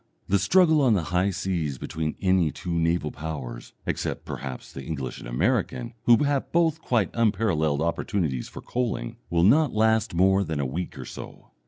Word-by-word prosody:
The 100 +1 +3
struggle 160 - +4
on 125 -5 +4
the 90 - 0
high 90 +2 +3
seas 90 -7 -2
between 80 +3 -3
any 95 -4 +3
two 90 - -6
naval 85 -2 +1
powers 70 -6 -6
(except, - - -3
perhaps, 65 -2 -7
the 65 - -7
English 70 -5 -5
and - - -9
American, 120 - 0
who 120 +3 +6
have 140 -2 0
both 165 -2 +2
quite 115 -9 +1
unparalleled 95 -10 +1
opportunities 80 -5 -1
for - - -10
coaling) 120 - -3
will 85 0 +2
not 140 - +5
last 110 -3 +2
more 95 +2 +4
than 80 -5 -3
a 70 - 0
week 85 +8 -4
or - - -7
so. - - -10
90 Hz, 175 wpm, -26 LUFS, 80-115 Hz, -, who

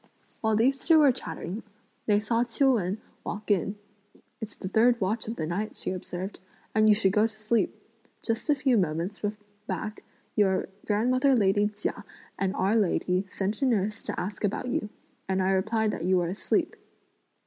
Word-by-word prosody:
While 220 -1 +2
these 265 +5 +2
two 325 -1 +7
were 295 -3 +7
chatting, 180 0 -6 0.5
they 205 -1 +4
saw 230 +2 +1
Ch'iu 250 +3 +3
Wen 195 -3 0 0.3
walk 210 +1 -4
in. 200 +1 +1 0.6
"It's 220 -2 -7
the 185 - -6
third 235 +5 +4
watch 210 +4 -1
of 225 - -3
the 160 - -2
night," 195 +7 -3
she - - -3
observed, 185 +1 -5 0.3
"and 215 0 +5
you 210 - +7
should 195 -3 +2
go 215 +2 +4
to 220 - -15
sleep. 215 -1 0 0.4
Just 230 +5 -2
a 295 - +5
few 260 -4 +3
moments 175 +3 -2 0.5
back 215 0 -4 0.3
your 190 -3 +2 0.2
grandmother 255 +6 +3
lady 205 -1 +3
Chia 205 0 -4 0.4
and 195 0 0
our 195 +3 +2
lady 190 -2 +1
sent 200 +5 -3
a - - +3
nurse 215 -2 0
to - - -3
ask 195 +5 -5
about 210 +5 -1
you, 210 - -1 0.4
and 190 0 +1
I 190 0 +2
replied 215 +3 +1
that - - -5
you 185 0 +3
were 175 -1 +1
asleep." 190 - 0
210 Hz, 180 wpm, -28 LUFS, 190-225 Hz, 0.6 s, two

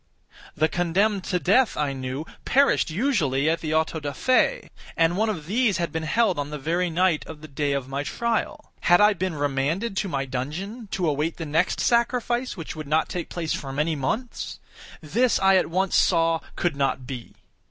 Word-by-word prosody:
The 155 - +3
condemned 185 +5 +1
to 180 - 0
death, 210 +8 +3
I 145 -2 0
knew, 130 +3 -4 0.2
perished 280 -7 +3
usually 155 - +1
at 165 +1 +2
the 155 -1 -1
autos 160 0 0
da 145 -1 -4
fe, 255 - +1 0.3
and 165 +1 +3
one 220 +3 +1
of 165 -8 -4
these 210 +1 +1
had 170 -1 -2
been 160 - -2
held 185 +2 +1
on 145 0 -3
the 150 - -5
very 170 +5 0
night 170 -1 +2
of 155 -2 -9
the 155 - -9
day 140 0 -1
of 135 -2 -2
my 135 +1 -3
trial. 230 - -2
Had 175 0 +4
I 210 0 +6
been 185 -2 -3
remanded 145 +9 -1
to 195 - -1
my 135 -4 -1
dungeon, 165 - -5
to 180 -3 0
await 150 +2 -1
the 165 - -5
next 160 +4 +1
sacrifice, 240 0 +1
which 165 - -6
would 155 -2 -7
not 155 +2 +1
take 175 -2 -4
place 165 -3 -2
for 135 - -5
many 150 +4 0
months? 220 - -3 0.4
This 225 - +2
I 190 0 +4
at 180 - +1
once 185 +2 0
saw 165 -2 +3 0.2
could 175 -4 0
not 135 -2 -1
be. 125 -3 -8
165 Hz, 195 wpm, -25 LUFS, 145-200 Hz, 0.4 s, I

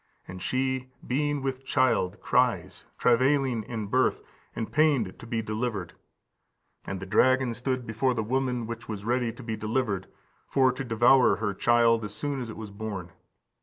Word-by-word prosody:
And 90 0 -8
she, 130 +2 -1 0.2
being 145 +2 0
with 135 -1 -3
child, 130 -8 +1
cries, - - 0
travailing 130 0 +3
in 110 0 -5
birth, 130 +6 +1 0.3
and 110 - -4
pained 140 -11 +2
to 120 - -10
be 115 -1 -2
delivered. 110 -4 -3 0.9
And 95 - -4
the 95 - -6
dragon 130 +5 +3
stood 125 +1 -2
before 125 +3 0
the 110 - -1
woman 125 0 -1
which 115 +1 -7
was 105 -2 -5
ready 120 0 +1
to 130 - -12
be 115 -1 -3
delivered, 110 -3 -1 0.4
for 130 -2 +3
to 130 +2 -5
devour 125 +2 +5
her 105 -2 -2
child 115 +1 +3
as 105 -1 -6
soon 145 0 -3
as 120 - -5
it 110 - -8
was 110 -2 -7
born. 100 -4 -6
120 Hz, 165 wpm, -27 LUFS, 110-130 Hz, 0.9 s, devour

